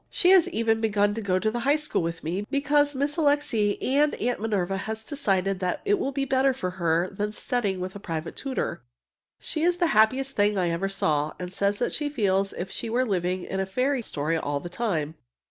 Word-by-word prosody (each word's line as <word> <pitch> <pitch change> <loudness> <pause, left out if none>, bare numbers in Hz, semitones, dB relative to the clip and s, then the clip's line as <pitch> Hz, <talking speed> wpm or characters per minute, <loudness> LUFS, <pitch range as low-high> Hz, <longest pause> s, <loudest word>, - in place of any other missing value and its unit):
She 360 - +3
has 370 -2 +6
even 225 -7 +1
begun 205 -2 +2
to 225 - -4
go 185 -3 +1
to 215 +3 0
the 240 - -2
high 280 +5 +3
school 300 -8 -1
with 165 0 -4
me, 185 +6 -3
because 290 0 +2
Miss 285 +4 -1
Alixe 285 -9 +2
and 290 +3 +2
Aunt 245 +1 -1
Minerva 195 -4 0
have 220 +3 -5
decided 195 -9 0
that 180 -1 -1
it 410 -1 +2
will 275 - -1
be 275 0 -1
better 270 0 +3
for 185 -8 -3
her 170 +1 +2
than 205 +2 -2
studying 210 -4 -1
with 185 +1 -5
a - - -6
private 165 -4 -5
tutor. 260 -10 -3 0.6
She 310 - -3
is 350 +2 +2
the 355 - +2
happiest 255 +6 +3
thing 205 0 +2
I 175 -2 +1
ever 180 +4 -1
saw, 155 -6 0
and 180 0 -6
says 200 +1 0
she 295 0 -2
feels 195 -7 +1
as - - -9
if 190 +1 -6
she 230 - -5
were 250 +3 +1
living 180 -3 -1
in 190 - -4
a 190 - 0
fairy 255 +6 0
story 160 -5 -1
all 145 -2 -2
the 175 - -7
time! 170 -7 -2
210 Hz, 220 wpm, -26 LUFS, 185-270 Hz, 0.6 s, has